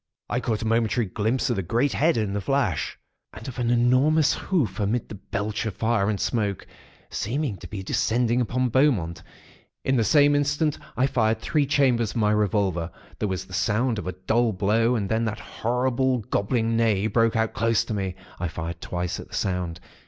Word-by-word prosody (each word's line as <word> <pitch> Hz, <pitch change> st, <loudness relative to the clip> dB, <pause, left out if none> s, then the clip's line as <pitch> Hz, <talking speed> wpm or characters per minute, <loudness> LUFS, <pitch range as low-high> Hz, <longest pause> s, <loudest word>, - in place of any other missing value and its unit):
I 120 Hz, -, +1 dB
caught 115 Hz, -3 st, -2 dB
a -, -, -3 dB
momentary 115 Hz, +1 st, +1 dB
glimpse 110 Hz, +7 st, 0 dB
of 120 Hz, -, -1 dB
the -, -, +1 dB
great 115 Hz, +10 st, +1 dB
head, 160 Hz, 0 st, +2 dB
in 105 Hz, -3 st, -1 dB
the 100 Hz, -, -1 dB
flash, 135 Hz, -, 0 dB, 0.4 s
and 110 Hz, +1 st, -9 dB
of 125 Hz, -2 st, -6 dB
an 120 Hz, -1 st, 0 dB
enormous 130 Hz, +6 st, +4 dB
hoof 125 Hz, -, -1 dB
amid 105 Hz, +3 st, 0 dB
the -, -, -7 dB
belch 105 Hz, +2 st, -3 dB
of 105 Hz, -, -4 dB
fire 110 Hz, -3 st, +1 dB
and 105 Hz, -2 st, -1 dB
smoke, 105 Hz, -5 st, -1 dB, 0.5 s
seeming 130 Hz, +1 st, -2 dB
to -, -, -10 dB
be 100 Hz, -3 st, -6 dB
descending 120 Hz, +5 st, +1 dB
upon 125 Hz, +2 st, 0 dB
Beaumont. 110 Hz, -, +2 dB, 0.6 s
In 130 Hz, 0 st, +2 dB
the 115 Hz, -, +3 dB
same 145 Hz, +6 st, +5 dB
instant, 145 Hz, +1 st, +1 dB, 0.2 s
I 125 Hz, -, +3 dB
fired 110 Hz, -4 st, +1 dB
three 145 Hz, +4 st, 0 dB
chambers 130 Hz, -6 st, +2 dB
of -, -, -5 dB
my 105 Hz, -2 st, +3 dB
revolver. 100 Hz, -5 st, +1 dB, 0.3 s
There 105 Hz, -, -1 dB
was 95 Hz, 0 st, -3 dB
the -, -, -13 dB
sound 115 Hz, +1 st, +1 dB
of -, -, -6 dB
a 90 Hz, -, -2 dB
dull 115 Hz, 0 st, +2 dB
blow, 110 Hz, +5 st, +2 dB
and 105 Hz, -4 st, -1 dB
then 110 Hz, +3 st, 0 dB
that 110 Hz, -1 st, -2 dB
horrible, 125 Hz, +2 st, 0 dB
gobbling 115 Hz, +3 st, 0 dB
neigh, 110 Hz, -3 st, +2 dB
broke 115 Hz, +1 st, +2 dB
out 110 Hz, 0 st, +1 dB
close 115 Hz, 0 st, +1 dB
to 115 Hz, -, -4 dB
me. 95 Hz, -3 st, -2 dB, 0.2 s
I 90 Hz, -, -1 dB
fired 85 Hz, +1 st, -5 dB
twice 90 Hz, 0 st, -3 dB
at -, -, -9 dB
the -, -, -7 dB
sound. 90 Hz, -3 st, -2 dB
115 Hz, 195 wpm, -25 LUFS, 100-125 Hz, 0.6 s, same